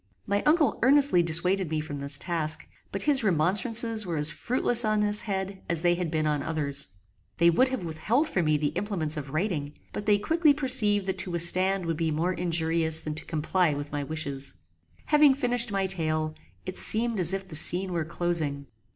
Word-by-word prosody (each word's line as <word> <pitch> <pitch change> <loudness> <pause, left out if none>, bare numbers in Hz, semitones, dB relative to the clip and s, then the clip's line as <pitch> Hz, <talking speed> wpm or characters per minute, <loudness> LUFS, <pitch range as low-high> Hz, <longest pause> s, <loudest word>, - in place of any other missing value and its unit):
My 200 0 -1
uncle 305 -1 +1
earnestly 275 -6 +5
dissuaded 175 +2 -1
me 155 -1 -3
from 150 -2 -7
this 140 +1 -4
task; 160 -2 -2 0.2
but - - -4
his 280 -4 +1
remonstrances 215 +6 +2
were 170 -4 -5
as 150 +1 +2
fruitless 245 -1 +3
on 215 -1 0
this 210 0 +1
head 190 -1 -5
as 170 -1 -2
they 175 0 +2
had 175 -1 -4
been 155 -1 -2
on 150 -1 -1
others. 140 -2 -4 0.5
They 170 +1 +3
would 255 +10 +1
have 260 -7 -5
withheld 190 - -2
from 180 - -2
me 155 0 +1
the 145 0 -2
implements 175 -7 -3
of 145 -3 -7
writing; 155 -2 -4 0.2
but 205 - -6
they 205 -1 +3
quickly 310 +7 +1
perceived 240 -8 +2
that 190 0 -4
to 190 - -3
withstand 185 +2 +2
would 165 -1 -3
be 165 0 -2
more 165 +4 -2
injurious 165 -2 +1
than 155 - -5
to 155 - -1
comply 160 0 -1
with 145 0 -7
my 145 -1 -4
wishes. 140 -2 -3 0.5
Having 295 -3 +3
finished 245 -3 +3
my 195 -1 -2
tale, 155 -4 -2 0.3
it - - -3
seemed 230 -1 +5
as 175 -1 +5
if 195 0 -3
the 165 - -8
scene 180 +4 +4
were 165 -2 -2
closing. 160 -4 -3
175 Hz, 195 wpm, -25 LUFS, 155-210 Hz, 0.5 s, earnestly